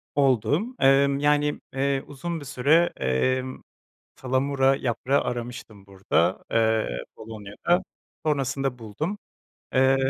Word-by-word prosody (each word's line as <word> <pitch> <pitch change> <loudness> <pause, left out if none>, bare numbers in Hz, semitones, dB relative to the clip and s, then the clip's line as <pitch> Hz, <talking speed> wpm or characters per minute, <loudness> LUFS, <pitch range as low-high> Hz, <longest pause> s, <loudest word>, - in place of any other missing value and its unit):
Oldu. 135 - +3 0.2
Emm, 140 +1 +4
yani, 145 0 +2
eee, 135 0 0
uzun 165 +4 -5
bir 145 - -10
süre, 145 +6 +3
emm, 130 - 0 0.6
salamura 135 +1 +2
yaprağı 135 +2 0
aramıştım 120 -4 -6
burada, 95 -2 0
eee, 110 -1 +2 0.3
Polonya'da, 110 - -2 0.4
sonrasında 135 -3 0
buldum. 150 - -4 0.6
Eee, 130 +1 +5
135 Hz, 100 wpm, -25 LUFS, 115-140 Hz, 0.6 s, Eee